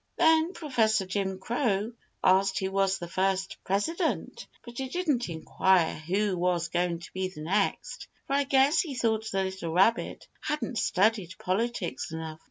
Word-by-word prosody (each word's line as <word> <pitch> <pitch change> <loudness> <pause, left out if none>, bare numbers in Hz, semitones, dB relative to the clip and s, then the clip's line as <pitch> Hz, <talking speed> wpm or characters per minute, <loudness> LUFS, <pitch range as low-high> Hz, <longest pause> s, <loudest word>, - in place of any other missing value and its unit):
Then 320 +2 +4
Professor 220 - +1
Jim 190 0 -2
Crow 225 0 -1 0.3
asked 190 +1 +4
who 190 0 -1
was 195 0 +2
the 175 - -6
first 190 +1 -1
President, 320 - -1 0.2
but 240 0 -8
he 265 -1 -3
didn't 290 - 0
enquire 170 +2 +2
who 190 +5 -1
was 175 -1 0
going 175 0 0
to 170 - -11
be 185 0 -1
the 165 -5 -10
next, 195 +6 -1 0.2
for 275 - -3
I 280 0 +2
guess 275 +3 +4
he 295 -6 -5
thought 220 -2 0
the 195 0 +1
little 190 -3 -4
rabbit 210 +6 +2
hadn't 295 -6 -2
studied 195 -2 +1
Politics 200 0 -2
enough. 160 -1 -6
195 Hz, 160 wpm, -28 LUFS, 185-240 Hz, 0.3 s, Then